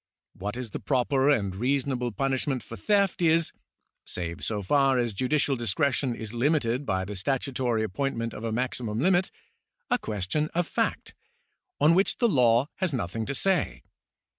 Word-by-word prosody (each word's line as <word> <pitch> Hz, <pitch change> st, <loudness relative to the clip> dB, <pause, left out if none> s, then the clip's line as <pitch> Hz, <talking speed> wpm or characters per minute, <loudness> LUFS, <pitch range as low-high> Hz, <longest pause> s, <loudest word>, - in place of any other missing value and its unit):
What 105 Hz, +5 st, -5 dB
is 125 Hz, -4 st, -5 dB
the -, -, -4 dB
proper 135 Hz, +1 st, +1 dB
and 100 Hz, -9 st, +1 dB
reasonable 125 Hz, +1 st, 0 dB
punishment 135 Hz, +3 st, -1 dB
for 115 Hz, -, -9 dB
theft 200 Hz, -, +1 dB
is 165 Hz, -1 st, +3 dB, 0.5 s
(save 85 Hz, -2 st, -6 dB
so 105 Hz, -2 st, -2 dB
far 135 Hz, +5 st, +3 dB
as 120 Hz, -3 st, 0 dB
judicial 135 Hz, +5 st, +1 dB
discretion 130 Hz, +1 st, 0 dB
is 110 Hz, -1 st, -7 dB
limited 130 Hz, 0 st, +1 dB
by 95 Hz, 0 st, 0 dB
the 105 Hz, +1 st, -6 dB
statutory 125 Hz, +1 st, -1 dB
appointment 115 Hz, +2 st, -2 dB
of 105 Hz, -, -8 dB
a 115 Hz, -, -2 dB
maximum 120 Hz, -2 st, -2 dB
limit) 185 Hz, +4 st, +3 dB, 0.6 s
a 245 Hz, -, +3 dB
question 110 Hz, -, -2 dB
of 175 Hz, 0 st, +2 dB
fact, -, -, -2 dB, 0.7 s
on 155 Hz, +3 st, +5 dB
which 190 Hz, +3 st, +2 dB
the 240 Hz, -, +3 dB
law 125 Hz, -, +4 dB
has 185 Hz, -7 st, -1 dB
nothing 110 Hz, 0 st, -3 dB
to 140 Hz, -, -2 dB
say. 165 Hz, -, +1 dB
125 Hz, 160 wpm, -27 LUFS, 110-145 Hz, 0.7 s, on